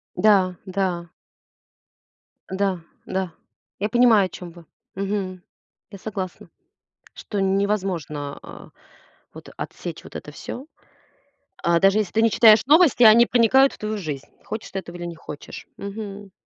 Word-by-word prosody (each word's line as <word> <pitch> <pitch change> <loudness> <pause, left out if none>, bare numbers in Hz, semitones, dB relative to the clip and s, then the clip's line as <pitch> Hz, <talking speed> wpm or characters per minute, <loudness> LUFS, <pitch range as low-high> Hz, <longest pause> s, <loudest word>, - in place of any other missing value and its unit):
Да, 195 -4 +4
да. 185 -3 -2 1.4
Да, 190 -1 -1 0.3
да, 190 -2 -3 0.5
я 210 +2 -1
понимаю, 230 -3 +5
о - - -5
чём 175 0 -9
вы. 170 0 -15 0.3
Мгм. 195 -2 -3 0.5
Я 200 - -9
согласна, 190 -2 -6 0.6
что 205 - -5
н 195 0 +2
невозможно, 180 -8 -2
а, - - -12 0.6
вот - - -12
отсечь - - -7
вот - - -10
это - - -8
всё, 265 - -8 0.9
а, 170 0 +2
даже 195 +4 +4
если 200 -5 -2
ты 220 - +3
не 230 - +4
читаешь 220 0 +6
новости, 300 -3 +5
они 230 +2 +8
проникают 265 +3 +4
в - - -13
твою 215 0 -3
жизнь, 150 -8 -5 0.2
хочешь 220 - -6
ты 195 - -3
этого 175 -2 -10
или 175 - -6
не 170 -1 -6
хочешь. 150 -2 -10
Мгм. 200 -1 -7
195 Hz, 145 wpm, -23 LUFS, 180-215 Hz, 1.4 s, они